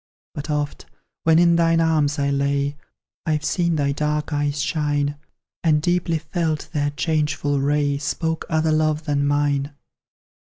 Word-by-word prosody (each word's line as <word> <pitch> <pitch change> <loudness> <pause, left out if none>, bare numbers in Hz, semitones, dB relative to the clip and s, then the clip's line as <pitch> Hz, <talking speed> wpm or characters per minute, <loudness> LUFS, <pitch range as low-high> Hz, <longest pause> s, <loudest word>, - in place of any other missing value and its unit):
But 145 +2 -6
oft, 150 -1 -2 0.4
when 160 0 +5
in 170 0 +5
thine 165 0 +3
arms 155 -2 +2
I 140 0 +1
lay, 140 +1 0 0.5
I've 155 -1 0
seen 170 -2 +1
thy 140 -2 +1
dark 150 +1 -1
eyes 145 0 0
shine, 145 +1 0 0.5
And 155 -3 +4
deeply 175 0 +1
felt 155 0 -2
their 145 -2 +1
changeful 145 -2 0
ray 145 0 +1
Spoke 160 +3 -2
other 160 0 +1
love 155 0 +1
than 145 -2 +1
mine. 145 0 0
150 Hz, 145 wpm, -22 LUFS, 145-160 Hz, 0.5 s, when